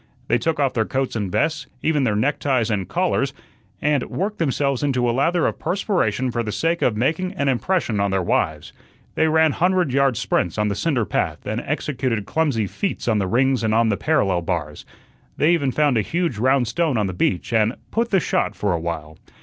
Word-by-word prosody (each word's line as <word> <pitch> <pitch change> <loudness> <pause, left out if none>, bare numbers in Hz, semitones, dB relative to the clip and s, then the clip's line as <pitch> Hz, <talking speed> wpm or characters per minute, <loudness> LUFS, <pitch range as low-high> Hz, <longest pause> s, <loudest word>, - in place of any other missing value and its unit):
They 120 - +3
took 160 +6 -1
off 140 -2 +1
their 110 - +1
coats 130 +3 -2
and 100 -5 -2
vests, 150 - 0 0.2
even 150 -4 +2
their 105 -3 +1
neckties 130 -1 +1
and 95 -3 -2
collars, 170 -6 0 0.5
and 145 -2 +2
worked 205 +4 -3
themselves 140 -4 0
into 130 -4 +1
a - - +2
lather 160 +7 +1
of - - -1
perspiration 150 - 0
for 120 0 -1
the 110 -2 -3
sake 165 +11 0
of 110 -4 +1
making 165 - 0
an 140 -7 -1
impression 135 - 0
on 100 0 +1
their 95 -1 0
wives. 80 -3 -1 0.4
They 160 - +2
ran 160 0 +4
hundred 180 -3 +1
yard 135 -3 +2
sprints 90 - -1
on 105 0 +1
the 100 - -2
cinder 130 -4 0
path - - -2
and 110 +3 -2
executed 130 -7 -2
clumsy 145 -8 0
feats 195 - -3
on 110 -3 +2
the 95 - 0
rings 130 +5 +2
and 110 0 +1
on 115 0 +3
the 105 - +2
parallel 100 - +1
bars. 80 -4 -4 0.5
They 155 - +3
even 140 -6 +1
found 145 -4 +2
a - - +3
huge 165 - -2
round 130 +1 +2
stone 155 0 0
on 105 - +1
the 95 - -3
beach 90 +4 -1
and 110 +1 +2 0.2
"put 235 +1 0
the 195 - +3
shot" - - -1
for 100 -3 0
a 85 - -1
while. 80 -2 -5
130 Hz, 210 wpm, -22 LUFS, 105-155 Hz, 0.5 s, ran